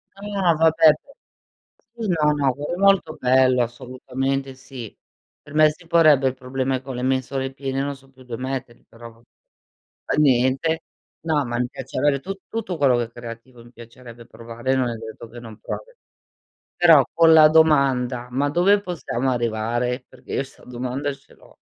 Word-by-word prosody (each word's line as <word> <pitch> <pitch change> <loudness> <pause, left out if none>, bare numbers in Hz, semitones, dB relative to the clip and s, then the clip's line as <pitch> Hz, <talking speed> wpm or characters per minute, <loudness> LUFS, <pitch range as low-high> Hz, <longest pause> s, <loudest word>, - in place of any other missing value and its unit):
Ah, 195 -4 0
vabbè, 160 -1 +5
p 275 - -17 0.9
sì, 215 - -2
no, 155 -4 +2
no, 140 -3 +1
quello 145 +5 -4
è - - -5
molto 195 -5 +3
bello, 130 0 +3
assolutamente 130 +2 -4
sì. 130 -4 -10 0.5
Per 145 - -15
me 155 0 +5
si 165 +2 -14
porrebbe 155 -5 +4
il 130 - -4
problema 130 0 -3
con 135 -1 -8
le 125 - -4
mensole 130 +1 -1
piene, 135 0 -4
non 140 0 -3
so 135 0 -22
più 130 -1 -19
dove 125 0 -7
metterli, 130 -2 -6
però 115 0 -12
va 115 +1 -24 0.8
fa - - -1
niente. 135 +4 +2 0.4
No, 155 -4 0
ma 120 0 -3
mi 125 - 0
piace 130 - -8
avere 145 -2 +2
tut 195 +5 -7
tutto 215 -6 -4
quello 135 -4 +3
che 120 - 0
è 115 - -16
creativo, 120 +1 -11
mi 120 - -17
piacerebbe 120 0 -13
provare 120 +2 -6
e - - +3
non 125 -2 0
è 115 - -4
detto 110 +1 -10
che 120 - -11
non 115 -2 -12
provi. - - -7 0.9
Però 165 -5 +7
con 165 -1 +5
la 155 -1 +8
domanda: 135 -6 +2
"Ma 140 +3 0
dove 190 +6 +3
possiamo 135 - -3
arrivare?" 120 +2 -2
Perché 130 - -12
io 135 - 0
'sta 135 - -17
domanda 125 +3 -4
ce 135 - -19
l'ho. - - -21
135 Hz, 185 wpm, -22 LUFS, 125-155 Hz, 0.9 s, la